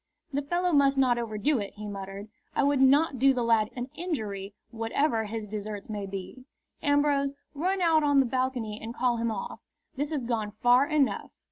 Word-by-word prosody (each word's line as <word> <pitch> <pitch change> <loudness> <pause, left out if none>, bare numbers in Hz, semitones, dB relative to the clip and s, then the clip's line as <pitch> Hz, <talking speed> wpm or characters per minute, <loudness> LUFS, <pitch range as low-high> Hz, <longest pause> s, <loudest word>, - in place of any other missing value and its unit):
"The 285 - +1
fellow 350 +5 0
must 275 -1 +4
not 250 -3 +3
overdo 235 +5 0
it," 200 -1 -5
he 210 0 -8
muttered. 200 0 -6 0.3
"I - - +2
would 280 -1 +2
not 275 0 +4
do 270 +1 +5
the 245 - 0
lad 225 -2 +3
an 250 +1 -5
injury, 210 - -4 0.2
whatever 225 +1 0
his 220 0 -4
deserts 210 0 -6
may 205 -2 -4
be. 195 +6 -7 0.4
Ambrose, 285 -1 +2 0.2
run 365 +6 -1
out 320 -2 +4
on 285 -1 +4
the 270 - +4
balcony 245 -4 -2
and 230 +2 -6
call 245 -1 +1
him 230 0 0
off. 210 -3 -5 0.4
This 290 +2 -1
has 290 -6 -2
gone 220 -3 -2
far 245 +3 +5
enough." 295 -3 +1
250 Hz, 190 wpm, -28 LUFS, 215-285 Hz, 0.4 s, do